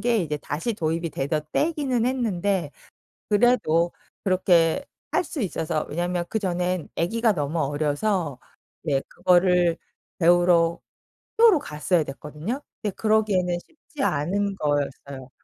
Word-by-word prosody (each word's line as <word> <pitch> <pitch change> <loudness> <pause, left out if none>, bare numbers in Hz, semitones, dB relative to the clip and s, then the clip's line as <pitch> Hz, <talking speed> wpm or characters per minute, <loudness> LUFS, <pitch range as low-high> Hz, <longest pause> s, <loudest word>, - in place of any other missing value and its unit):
게 235 -2 +2
이제 150 -5 -1
다시 155 +10 -3
도입이 165 -1 -2
되던 145 +3 -1
때이기는 285 -7 +1
했는데 200 - 0 0.6
그래도 205 -7 +3 0.3
그렇게 180 - +3 0.3
할 365 - +1
수 300 - -5
있어서 160 -5 -2
왜냐하면 175 +2 -1
그 220 - -1
전엔 180 -3 -1
아기가 225 +7 +2
너무 155 -2 -2
어려서 145 +2 -1 0.5
이제 140 -4 +1
그거를 180 -2 +3 0.4
배우러 170 -1 +4 0.6
학교로 450 -9 +6
갔어야 155 - 0
됐거든요. 150 - -5 0.2
근데 205 -3 -2
그러기에는 210 -5 +2
쉽지 300 -3 -9
않은 195 - 0
거였어요. 140 -3 -3
175 Hz, 295 characters per minute, -24 LUFS, 155-215 Hz, 0.6 s, 학교로